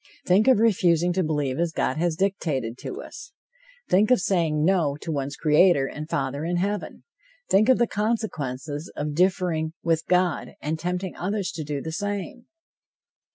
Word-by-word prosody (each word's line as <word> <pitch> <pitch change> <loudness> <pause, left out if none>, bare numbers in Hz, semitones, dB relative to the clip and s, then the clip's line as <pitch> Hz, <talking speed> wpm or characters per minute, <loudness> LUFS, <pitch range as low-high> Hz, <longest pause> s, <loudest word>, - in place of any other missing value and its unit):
Think 195 +6 +4
of 260 - +6
refusing 175 -6 +3
to 185 +1 +1
believe 150 -4 -1
as 170 -1 +1
God 135 - -1
has 170 0 0
dictated 155 - -1
to - - -6
us! - - -11 0.5
Think 205 +4 +3
of 250 - +5
saying 160 -5 +1
no! 165 -6 +2
to 165 - -4
one's 140 -1 -3
Creator 155 -1 +4
and 150 +3 -7
Father 140 -2 -2
in 175 +2 -1
Heaven! 200 +2 -3 0.5
Think 210 +5 +4
of 260 - +6
the 240 - +3
consequences 160 - -3
of 150 0 -3
differing 175 -2 +1
with 165 -1 0
God, 180 -3 +1
and 155 +2 -3
tempting 180 +2 -3
others 195 +1 -2
to 160 - -5
do 145 -1 -4
the 160 - -4
same! 205 - -4
170 Hz, 165 wpm, -25 LUFS, 150-195 Hz, 0.5 s, of